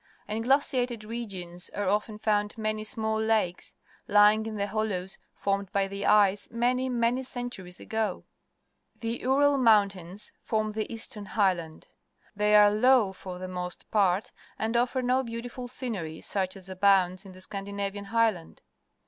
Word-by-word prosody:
In 215 +1 -2
glaciated 250 -2 +1
regions 195 -6 -4
are 205 -1 -1
often 210 +2 0
found 210 0 0
many 215 -1 -2
small 220 -1 -2
lakes, 220 -5 0 0.3
Ijnng 210 +1 +5
in 220 - -5
the 200 -1 -1
hollows 200 -3 -3 0.2
formed 200 -1 -1
by 200 -1 +1
the 200 +1 -3
ice 205 -1 +4
many, 250 +2 0
many 240 +1 +1
centuries 245 -8 -7
ago. 220 -1 -2 0.8
The 230 +1 -3
Ural 280 +2 +3
Mountains 200 -5 +2
form 215 -1 -1
the 215 +1 -4
Eastern 220 -2 -5
Higldand. 180 -7 0 0.5
They 210 +1 +3
are 210 0 +7
low, 220 -2 +4
for 185 -1 -8
the 185 +1 -6
most 180 -1 -6
part, 195 -2 +2 0.3
and 225 +2 -2
offer 250 +2 +1
no 255 +1 +2
beautiful 245 +1 -6
scenerj' 215 -11 -5
such 190 -1 -1
as 190 -1 -11
a 190 - -7
bounds 185 -1 +3
in 190 -2 -12
the 185 - -12
Scan 195 +1 -5
dinavian 200 0 -4
Highland. 220 -6 0
210 Hz, 155 wpm, -28 LUFS, 195-230 Hz, 0.8 s, are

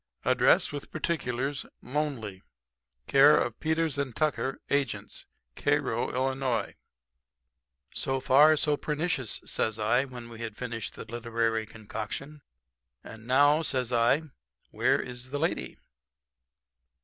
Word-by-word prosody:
Address, - - +4
with 145 -1 -6
particulars. 140 -4 -2 0.2
Lonely, 125 -9 -3 0.6
Care 140 - +7
of 120 - -1
Peters 160 -2 0
& - - -13
Tucker, 150 -3 0
agents, 140 -4 -1 0.3
Cairo, 145 -5 0
Ill. 130 -1 0 1.3
"'So 135 0 0
far, 150 +4 +6
so 150 0 +2
pernicious,' 150 - -1
says 110 -1 -1
I, 120 +5 +2
when 125 -3 -9
we 115 -1 -10
had 110 -2 -6
finished 120 -3 -5
the - - -7
literary 115 -1 -1
concoction. 115 +7 -6 0.6
'And 110 +1 -11
now,' 145 +4 +5
says 130 -6 -1
I, 120 +6 +3 0.5
'where - - +2
is 125 0 -6
the 145 - -3
lady.' 165 +4 -2
130 Hz, 115 wpm, -28 LUFS, 115-145 Hz, 1.3 s, Care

